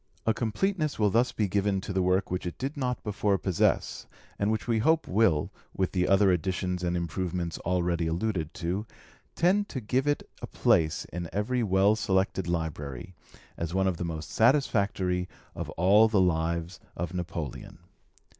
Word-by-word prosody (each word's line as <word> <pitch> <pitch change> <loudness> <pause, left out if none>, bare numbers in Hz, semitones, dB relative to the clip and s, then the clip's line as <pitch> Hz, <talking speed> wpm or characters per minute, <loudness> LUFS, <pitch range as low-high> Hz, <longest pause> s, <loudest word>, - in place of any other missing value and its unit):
A 115 - +3
completeness 155 - -1
will 105 -2 +2
thus 120 +4 +3
be 105 - 0
given 100 0 +1
to 100 - -5
the 95 - +1
work 90 +1 +1
which 90 0 -2
it 85 - -6
did 135 +3 -3
not 125 -3 -2
before 105 -1 0
possess, 95 -3 0 0.3
and 100 +1 +1
which 110 - -2
we 115 -2 +2
hope 160 +8 +2
will, 95 -7 +2 0.3
with 95 -1 0
the 90 -1 +1
other 95 0 +5
additions 90 0 -1
and 90 0 0
improvements 85 0 -3
already 85 -1 0
alluded 85 -2 -1
to, 95 +6 -3 0.5
tend 195 +4 +2
to 130 - -4
give 130 +5 0
it 145 - 0
a - - -5
place 80 -2 +2
in 85 -1 -4
every 115 +5 0
well 100 0 +3
selected 95 -3 0
library, 80 -3 -4 0.4
as 85 +1 -3
one 95 0 +2
of 95 -3 0
the - - -3
most 80 -2 -5
satisfactory 100 -8 +2 0.2
of - - -5
all 100 +6 +6
the 110 -3 +2
lives 85 -1 0 0.2
of 85 0 -3
Napoleon. 85 -5 -5
95 Hz, 170 wpm, -28 LUFS, 85-110 Hz, 0.5 s, all